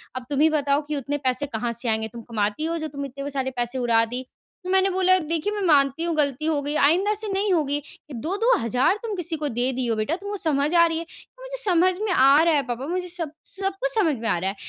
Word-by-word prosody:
"अब 255 - -5
तुम 285 -1 -1
ही 320 - +6
बताओ 285 -1 +1
कि 305 - -2
उतने 285 +1 -2
पैसे 260 0 -1
कहाँ 235 -3 -3
से 235 0 -1
आएँगे? 220 0 0
तुम 235 +2 -10
कमाती 220 +5 -2
हो 335 +1 -1
जो 315 -1 -4
तुम 280 -1 -6
इतने 275 +2 -6
सारे 265 -1 -2
पैसे 240 +2 -1
उड़ा 230 -2 +3
दी?" 250 +3 -5 0.4
तो 365 - -6
मैंने 380 +1 +3
बोला 370 0 +3
"देखिए 335 +5 -2
मैं 415 - -3
मानती 280 +1 +4
हूँ 340 -2 -1
गलती 290 0 0
हो 305 -3 +1
गयी, 290 +1 -3
आइंदा 360 +9 +3
से 425 +1 -4
नहीं 395 +1 0
होगी। 290 -3 0 0.3
2-2 345 - +1
तुम 435 -3 -3
किसी 340 -2 -3
को 300 -1 -2
दे 245 +3 0
दिए 245 -1 -2
हो 225 - +1
बेटा 215 +10 -1
तुमको 405 +2 -6
समझ 305 -3 +1
आ 335 0 +7
रही 325 -1 -1
है? 335 - -6 0.4
मुझे - - -6
समझ 370 -5 +3
में 430 -3 -1
आ 275 0 +6
रहा 335 - +3
है 290 - +3
पापा 245 +2 -4
मुझे 360 +1 -2
सब 335 -4 -5 0.2
सब 390 0 -3
कुछ - - +1
समझ 345 -10 +2
में 225 0 -4
आ - - +2
रहा 190 +3 -1
है। 200 - -5
295 Hz, 255 wpm, -24 LUFS, 255-360 Hz, 0.4 s, आ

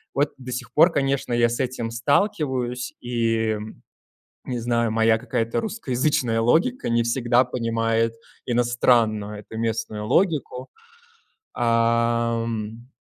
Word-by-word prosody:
Вот 145 +1 +2
до 125 -1 -8
сих 125 - -6
пор, 165 +4 +6
конечно, 135 -4 -1
я 120 0 +3
с 120 - -3
этим 125 -3 -2
сталкиваюсь, 130 - 0
и 115 -2 0 0.9
не 125 -2 -3
знаю, 115 -1 0
моя 110 0 +3
какая-то 115 -1 -2
русскоязычная 130 - 0
логика 165 - +2
не 115 0 +2
всегда 120 +1 +2
понимает 115 -2 0 0.3
иностранную 115 -4 +1
эту 110 +1 -9
местную 110 -2 -3
логику. 145 - 0 0.8
Ам, 115 -1 0
120 Hz, 110 wpm, -23 LUFS, 115-125 Hz, 0.9 s, пор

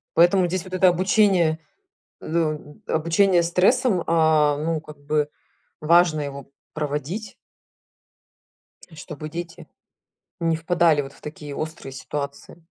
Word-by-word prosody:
Поэтому 175 +2 +5
здесь 180 0 -3
вот 185 - -9
это 185 0 +5
обучение, 180 -2 +3 0.6
ду 165 +2 -2
м 155 -2 -3
обучение 170 +3 +2
стрессам, 185 +4 +2
а 155 -3 +3
ну 160 +1 -1
как 150 -2 -13
бы 150 0 0 0.5
важно 160 -1 +4
его 140 -1 -7 0.2
проводить 155 +8 -4 1.6
чтобы 155 -1 -8
дети 170 +1 -7 0.7
не 165 -1 +1
впадали 165 -2 +2
вот 135 -1 -9
в - - -20
такие 150 -1 -8
острые 155 -2 -6
ситуации. 140 +4 -7
160 Hz, 115 wpm, -23 LUFS, 150-175 Hz, 1.6 s, Поэтому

